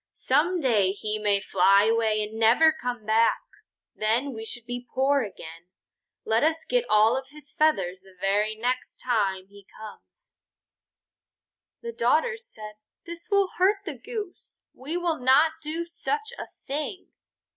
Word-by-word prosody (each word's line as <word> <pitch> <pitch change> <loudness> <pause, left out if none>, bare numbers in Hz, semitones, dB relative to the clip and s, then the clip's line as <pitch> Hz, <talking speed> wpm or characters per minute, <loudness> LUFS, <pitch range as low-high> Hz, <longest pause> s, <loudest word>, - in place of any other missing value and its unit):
Some 325 +7 +1
day 215 - +2
he 215 +1 -3
may 205 -1 +2
fly 195 0 +4
away 220 -1 +1
and 215 +1 -7
never 245 +9 +5
come 245 -7 -5
back. 220 +2 +3 0.5
Then 235 +6 0
we 220 -1 -7
should 235 +1 -5
be 245 0 -6
poor 275 +2 +2
again. 170 -5 -9 0.6
Let 225 +3 +2
us 320 +1 +1
get - - 0
all 215 +2 +4
of 265 0 -4
his 295 0 -13
feathers 190 - +1
the 190 -1 -20
very 205 +3 +1
next 250 +3 -2
time 200 -6 -1
he 200 0 -18
comes." 220 - -14 1.5
The 470 0 -5
daughters 455 - 0
said: 215 - -10 0.3
"This 340 +3 -8
will 400 -2 +2
hurt 395 +2 +2
the 335 - -4
Goose. 415 - -8 0.2
We 295 +7 -5
will 345 -2 -1
not 265 +6 +4
do 320 +2 -4
such 435 +6 -4
a - - -7 0.2
thing." 300 +6 -5
245 Hz, 150 wpm, -26 LUFS, 215-320 Hz, 1.5 s, never